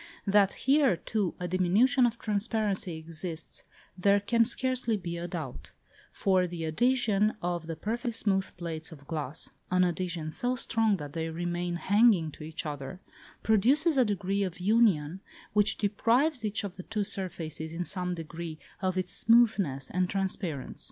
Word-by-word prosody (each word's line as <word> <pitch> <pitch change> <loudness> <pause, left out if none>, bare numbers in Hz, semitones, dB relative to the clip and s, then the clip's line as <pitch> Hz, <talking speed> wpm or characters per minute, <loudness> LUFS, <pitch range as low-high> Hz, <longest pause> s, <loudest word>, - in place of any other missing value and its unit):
That 200 -1 +4
here, 270 - +4
too, 205 0 -2
a 180 - -3
diminution 210 +9 +3
of 235 0 -4
transparency 210 -5 -1
exists 160 0 -6 0.3
there 200 +2 +3
can 230 +3 +3
scarcely 250 -2 0
be 175 -3 -5
a 170 +1 -4
doubt; 160 -8 -7 0.4
for 185 -2 +2
the 170 -2 -5
adhesion 215 +3 +2
of 175 -3 -3
the 165 - -4
perfectly 235 - -3
smooth 200 -4 0
plates 165 -1 -5
of 145 -3 -12
glass 150 -2 -4 0.2
(an 185 0 +3
adhesion 175 -2 -2
so 245 +10 -1
strong 225 -4 +2
that 145 -3 -8
they 165 -1 -2
remain 175 +1 -2
hanging 200 -3 +3
to 150 - -11
each 155 +1 -6
other) 145 +2 -6 0.4
produces 270 - +4
a 260 - +5
degree 200 -2 -1
of 185 -3 -3
union 190 -5 +2 0.3
which 210 0 +3
deprives 235 +7 +1
each 210 0 0
of 195 -2 -6
the 185 - -7
two 215 -2 0
surfaces, 170 -6 -3
in 170 +2 -3
some 180 -1 -1
degree, 165 0 -7 0.2
of 185 -1 0
its 185 - -1
smoothness 200 - +3
and 180 0 0
transparence. 190 -7 -3
185 Hz, 160 wpm, -29 LUFS, 165-220 Hz, 0.4 s, a